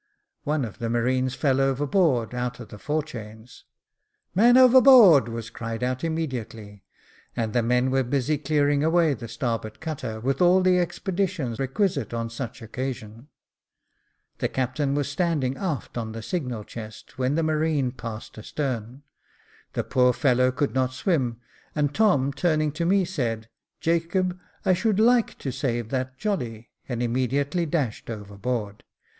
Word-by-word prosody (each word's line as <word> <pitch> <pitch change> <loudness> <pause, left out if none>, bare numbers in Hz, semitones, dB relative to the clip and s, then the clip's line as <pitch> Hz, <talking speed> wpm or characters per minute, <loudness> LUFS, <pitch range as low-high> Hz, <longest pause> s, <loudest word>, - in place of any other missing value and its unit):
One 150 -2 0
of 110 - -10
the 115 - -2
marines 125 +2 0
fell 135 -2 +2
overboard, 135 - +1
out 125 0 -3
of 120 - -9
the 105 - -10
forechains. 120 -5 -5 0.7
"Man 240 +6 +6
overboard," 255 - +8
was 115 0 -6
cried 115 +1 -5
out 130 0 -1
immedi 160 -7 -2
ately, 105 -2 -13 0.5
and 110 -2 -2
the 120 - +3
men 125 +2 +1
were 135 0 +3
busy 140 +3 0
clearing 145 -1 +1
away 165 -1 +3
the 120 -3 -7
starboard 115 -1 -3
cutter, 135 -9 -5
with 135 +5 -1
all 180 +1 +5
the 185 -1 +4
expedition 175 - -2
requisite 135 - -1
on 115 0 -3
such 115 +1 -6
an - - -8
occasion. 120 0 -6 1.1
The - - +1
captain 135 +2 -1
was 145 -1 0
standing 145 -4 0
aft 160 -5 -4
on 110 -1 -5
the 115 0 -7
signal 125 - -3
chest, 110 +3 -10
when 130 +2 +1
the 165 - +1
marine 155 -4 +1
passed 115 -3 -8
astern; 125 +1 -4 0.7
the - - -1
poor 125 -1 +3
fellow 130 -2 +3
could 140 +2 -1
not 130 -1 0
swim, 130 - 0 0.4
and 145 -1 0
Tom 145 -11 +3
turning 155 -1 +1
to 170 +3 -2
me 195 0 +3
said, 115 -10 -3 0.3
"Jacob, 175 +2 0 0.3
I 185 - +5
should 210 +2 +1
/ike 235 +1 +3
to 135 - -4
save 120 -3 -2
that 130 0 -3
jolly," 120 - -3 0.2
and 120 -1 -2
immediately 135 +7 0
dashed 145 -10 -2
overboard. 105 0 -4
130 Hz, 150 wpm, -25 LUFS, 115-160 Hz, 1.1 s, overboard